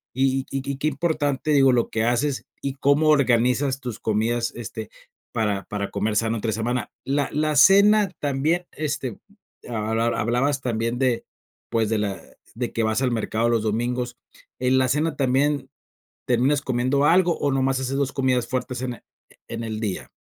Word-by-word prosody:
Y 135 Hz, 0 st, +1 dB
y 135 Hz, 0 st, -2 dB
y 135 Hz, -, -5 dB
qué 150 Hz, +3 st, -1 dB
importante, 150 Hz, -1 st, 0 dB
digo, 135 Hz, -2 st, +5 dB
lo 120 Hz, -2 st, +1 dB
que 110 Hz, -, -1 dB
haces 125 Hz, +4 st, 0 dB, 0.2 s
y 140 Hz, -1 st, -2 dB
cómo 140 Hz, +3 st, +3 dB
organizas 130 Hz, -1 st, +3 dB
tus 120 Hz, -3 st, -6 dB
comidas, 115 Hz, +2 st, 0 dB
este, 110 Hz, -2 st, -7 dB, 0.4 s
para 105 Hz, -3 st, 0 dB
para 100 Hz, -1 st, -4 dB
comer 105 Hz, 0 st, -1 dB
sano, 115 Hz, +1 st, +1 dB
entre 110 Hz, +1 st, -2 dB
semana. 120 Hz, +3 st, -2 dB
La 140 Hz, +1 st, 0 dB
la 155 Hz, 0 st, 0 dB
cena 200 Hz, +6 st, +6 dB
también, 150 Hz, +5 st, 0 dB
este, 145 Hz, -6 st, -4 dB, 0.5 s
hab 110 Hz, -1 st, -1 dB
hab 115 Hz, +1 st, +1 dB
hablabas 130 Hz, +5 st, 0 dB
también 115 Hz, 0 st, -1 dB
de, 125 Hz, -3 st, +1 dB, 0.5 s
pues, 110 Hz, -2 st, +1 dB
de 110 Hz, -1 st, +1 dB
la 100 Hz, -2 st, -2 dB, 0.4 s
de 120 Hz, +1 st, -3 dB
que 115 Hz, -, 0 dB
vas 110 Hz, +3 st, +1 dB
al 125 Hz, -, +1 dB
mercado 115 Hz, 0 st, 0 dB
los 115 Hz, -2 st, +2 dB
domingos, 120 Hz, +3 st, -2 dB, 0.4 s
¿en 130 Hz, +1 st, +2 dB
la 130 Hz, -, +2 dB
cena 155 Hz, +4 st, 0 dB
también, 135 Hz, +1 st, +1 dB, 0.6 s
terminas 130 Hz, +4 st, +2 dB
comiendo 130 Hz, +2 st, 0 dB
algo 175 Hz, +1 st, +4 dB
o 145 Hz, -, +1 dB
nada 135 Hz, 0 st, +1 dB
más 135 Hz, 0 st, +1 dB
haces 130 Hz, +1 st, -2 dB
2 140 Hz, -1 st, -1 dB
comidas 125 Hz, -3 st, +1 dB
fuertes 125 Hz, -1 st, -3 dB
en 125 Hz, -1 st, -2 dB
e -, -, -20 dB, 0.5 s
en 115 Hz, 0 st, -4 dB
el 110 Hz, -1 st, -4 dB
día? 100 Hz, -5 st, -3 dB
125 Hz, 180 wpm, -23 LUFS, 115-140 Hz, 0.6 s, cena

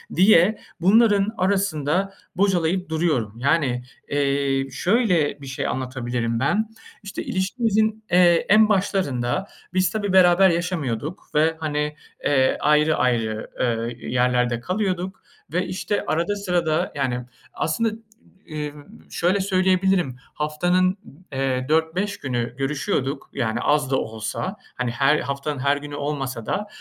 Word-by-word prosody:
diye 190 Hz, +2 st, +5 dB, 0.2 s
bunların 205 Hz, +1 st, +4 dB
arasında 190 Hz, -1 st, 0 dB, 0.2 s
bocalayıp 185 Hz, -2 st, +1 dB
duruyorum. 155 Hz, -10 st, 0 dB
Yani, 135 Hz, -2 st, +1 dB, 0.3 s
eee, 140 Hz, -1 st, 0 dB
şöyle 180 Hz, -, +1 dB
bir 140 Hz, -, -9 dB
şey 135 Hz, -, -3 dB
anlatabilirim 120 Hz, -3 st, -2 dB
ben. 210 Hz, +11 st, +1 dB, 0.4 s
İşte 200 Hz, -, -5 dB
ilişkimizin, 220 Hz, +2 st, 0 dB
eee, 175 Hz, -1 st, +5 dB
en 215 Hz, +1 st, +6 dB
başlarında 185 Hz, -, 0 dB, 0.3 s
biz 185 Hz, 0 st, +3 dB
tabii 205 Hz, -3 st, -2 dB
beraber 185 Hz, 0 st, +6 dB
yaşamıyorduk 165 Hz, -, -2 dB
ve 160 Hz, +2 st, +3 dB
hani, 150 Hz, -1 st, -2 dB, 0.3 s
eee, 135 Hz, -2 st, +3 dB
ayrı 150 Hz, +1 st, +3 dB
ayrı, 115 Hz, -3 st, 0 dB
ııı, 115 Hz, -1 st, 0 dB
yerlerde 125 Hz, 0 st, 0 dB
kalıyorduk. 185 Hz, -, -2 dB, 0.3 s
Ve 180 Hz, +2 st, +1 dB
işte 205 Hz, +2 st, -2 dB
arada 170 Hz, +6 st, 0 dB
sırada, 175 Hz, -6 st, 0 dB
yani 125 Hz, -3 st, -1 dB, 0.3 s
aslında, 225 Hz, +9 st, 0 dB, 0.6 s
ımm, 150 Hz, -, -7 dB
şöyle 185 Hz, +4 st, +1 dB
söyleyebilirim, 185 Hz, -6 st, +2 dB, 0.2 s
haftanın, 175 Hz, +5 st, +1 dB, 0.4 s
eee, 130 Hz, -1 st, -1 dB
4-5 160 Hz, +6 st, +1 dB
günü 120 Hz, -2 st, -3 dB
görüşüyorduk 135 Hz, 0 st, -2 dB
yani, 120 Hz, -3 st, -1 dB
az 145 Hz, -1 st, +1 dB
da -, -, +3 dB
olsa. 110 Hz, -, -4 dB, 0.2 s
Hani, 125 Hz, -1 st, -2 dB
her 135 Hz, +4 st, +3 dB
haftanın 140 Hz, 0 st, -3 dB
her 140 Hz, +1 st, +2 dB
günü 145 Hz, 0 st, -7 dB
olmasa 135 Hz, -5 st, -3 dB
da 210 Hz, -, -2 dB
155 Hz, 120 wpm, -23 LUFS, 135-185 Hz, 0.6 s, en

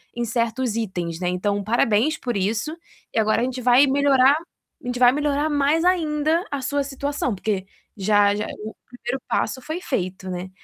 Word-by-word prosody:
em 240 Hz, -, -2 dB
certos 235 Hz, +1 st, -1 dB
itens, 175 Hz, -7 st, -3 dB
né. 180 Hz, -1 st, -1 dB
Então 200 Hz, +3 st, -1 dB
parabéns 225 Hz, +5 st, +2 dB
por 240 Hz, -5 st, -3 dB
isso, 220 Hz, -, -1 dB, 0.4 s
e -, -, +1 dB
agora 215 Hz, +1 st, +2 dB
a -, -, +1 dB
gente 255 Hz, 0 st, -4 dB
vai 250 Hz, +3 st, +5 dB
melhorar 275 Hz, 0 st, +4 dB, 0.5 s
a 245 Hz, -, -8 dB
gente 245 Hz, -, -2 dB
vai 245 Hz, -1 st, +7 dB
melhorar 295 Hz, +2 st, 0 dB
mais 295 Hz, +3 st, +2 dB
ainda 320 Hz, -2 st, +2 dB
a 285 Hz, -1 st, -2 dB
sua 285 Hz, +2 st, 0 dB
situação, 280 Hz, -3 st, -2 dB
porque 195 Hz, -1 st, -2 dB, 0.3 s
já 205 Hz, 0 st, +3 dB
já 210 Hz, -, -2 dB, 0.2 s
o 220 Hz, -, -6 dB, 0.2 s
primeiro 245 Hz, +1 st, -5 dB
passo 240 Hz, +5 st, -1 dB
foi 315 Hz, +7 st, -5 dB
feito, 185 Hz, -, -3 dB
né. 180 Hz, +1 st, -5 dB
245 Hz, 180 wpm, -23 LUFS, 210-285 Hz, 0.5 s, vai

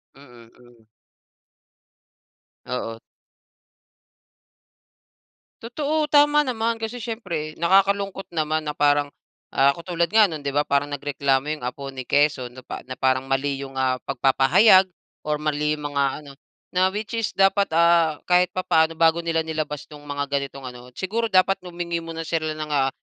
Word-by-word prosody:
Mm, 120 Hz, -4 st, -16 dB
mm. 120 Hz, -2 st, -21 dB, 1.8 s
Oo. 115 Hz, -2 st, -4 dB, 2.6 s
Totoo 300 Hz, +5 st, -2 dB
tama 295 Hz, 0 st, +5 dB
naman, 230 Hz, -4 st, -1 dB
kasi 225 Hz, +2 st, -4 dB
syempre 180 Hz, -10 st, -5 dB
nakakalungkot 195 Hz, +2 st, +2 dB
naman 155 Hz, -1 st, -1 dB
na 150 Hz, -, -3 dB
parang, 145 Hz, 0 st, +2 dB, 0.4 s
ah, 140 Hz, +1 st, +4 dB
katulad 170 Hz, -1 st, -2 dB
nga 220 Hz, +1 st, +6 dB
no'n 160 Hz, -6 st, -5 dB
'di 140 Hz, -, -2 dB
ba, 145 Hz, -, +3 dB
parang 140 Hz, +1 st, 0 dB
nagreklamo 140 Hz, -1 st, -1 dB
yung -, -, -14 dB
apo 135 Hz, +2 st, -5 dB
ni 130 Hz, -1 st, -7 dB
Quezon 145 Hz, -4 st, +2 dB
na 130 Hz, -, -11 dB
pa -, -, -7 dB
na 130 Hz, -, -7 dB
parang 130 Hz, 0 st, +1 dB
mali 135 Hz, 0 st, -1 dB
yung, 135 Hz, -1 st, -8 dB
ah, 130 Hz, -1 st, 0 dB
pagpapahayag 185 Hz, -, +5 dB, 0.4 s
or 150 Hz, 0 st, 0 dB
mali 150 Hz, 0 st, -1 dB
yung 150 Hz, -, -8 dB
mga 140 Hz, 0 st, +2 dB, 0.2 s
ano. 140 Hz, -, -12 dB, 0.4 s
Na, 185 Hz, +1 st, +3 dB
which 210 Hz, +4 st, -6 dB
is 225 Hz, -2 st, -1 dB
dapat 195 Hz, +1 st, +3 dB
ah, 165 Hz, -1 st, +3 dB
kahit 180 Hz, 0 st, +3 dB
papaano 165 Hz, -3 st, +1 dB
bago 165 Hz, +1 st, +3 dB
nila 165 Hz, -1 st, -1 dB
nilabas 155 Hz, -2 st, -4 dB
yung 145 Hz, -, -11 dB
mga 145 Hz, 0 st, -2 dB
ganitong 140 Hz, -1 st, -4 dB
ano 125 Hz, 0 st, -13 dB
siguro, 225 Hz, +4 st, -2 dB
dapat 190 Hz, 0 st, +3 dB
humingi 170 Hz, -1 st, -4 dB
muna 165 Hz, 0 st, -6 dB
sila 160 Hz, -1 st, -1 dB
ng, 155 Hz, -1 st, -5 dB
ah, 135 Hz, -2 st, +2 dB
155 Hz, 150 wpm, -23 LUFS, 140-185 Hz, 2.6 s, nga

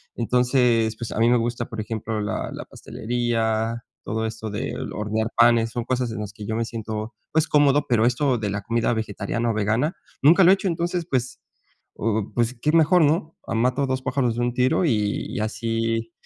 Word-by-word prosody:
Entonces, 120 Hz, -2 st, +2 dB
pues, 115 Hz, -, -6 dB
a -, -, -3 dB
mí 115 Hz, +1 st, +4 dB
me 120 Hz, -, +5 dB
gusta, 120 Hz, +1 st, -2 dB
por 115 Hz, -3 st, -6 dB
ejemplo, 110 Hz, 0 st, -4 dB
la 105 Hz, -, -3 dB
la -, -, -7 dB
pastelería, 115 Hz, -1 st, -2 dB, 0.2 s
todo 110 Hz, +1 st, -2 dB
esto 110 Hz, 0 st, -5 dB
de 105 Hz, -, -4 dB, 0.2 s
hornear 110 Hz, +1 st, -2 dB
panes 115 Hz, -1 st, +5 dB
son 120 Hz, 0 st, -3 dB
cosas 125 Hz, -2 st, -1 dB
en 110 Hz, -, -5 dB
las 105 Hz, 0 st, -6 dB
que 105 Hz, -2 st, -9 dB
yo 110 Hz, -, -2 dB
me 115 Hz, +1 st, 0 dB
siento, 110 Hz, -1 st, -5 dB, 0.2 s
pues, 160 Hz, 0 st, +2 dB
cómodo, 145 Hz, -1 st, +3 dB
pero 115 Hz, -2 st, +3 dB
esto 125 Hz, +1 st, +1 dB
de 105 Hz, -2 st, -2 dB
la 100 Hz, +1 st, -3 dB
comida 115 Hz, +2 st, 0 dB
vegetariana 110 Hz, +1 st, -2 dB
o -, -, -2 dB
vegana 110 Hz, -, 0 dB, 0.3 s
nunca 170 Hz, +6 st, +7 dB
lo 180 Hz, -, +7 dB
he -, -, +8 dB
hecho. 195 Hz, -, -4 dB
Entonces, 170 Hz, 0 st, -1 dB
pues, 130 Hz, -1 st, -1 dB, 0.6 s
oh, 110 Hz, -1 st, -1 dB
pues 120 Hz, +1 st, +1 dB
qué 150 Hz, -, +2 dB
mejor, 165 Hz, +2 st, +5 dB
¿no? 155 Hz, +2 st, 0 dB
Ah, -, -, -3 dB
mato 125 Hz, +4 st, +1 dB
2, 130 Hz, 0 st, -1 dB
pájaros 130 Hz, -2 st, 0 dB
de 120 Hz, -, -2 dB
un 120 Hz, 0 st, 0 dB
tiro 130 Hz, +8 st, +2 dB
y 105 Hz, -7 st, 0 dB
y 130 Hz, -, -4 dB
así, 115 Hz, +1 st, -2 dB
115 Hz, 205 wpm, -23 LUFS, 110-130 Hz, 0.6 s, he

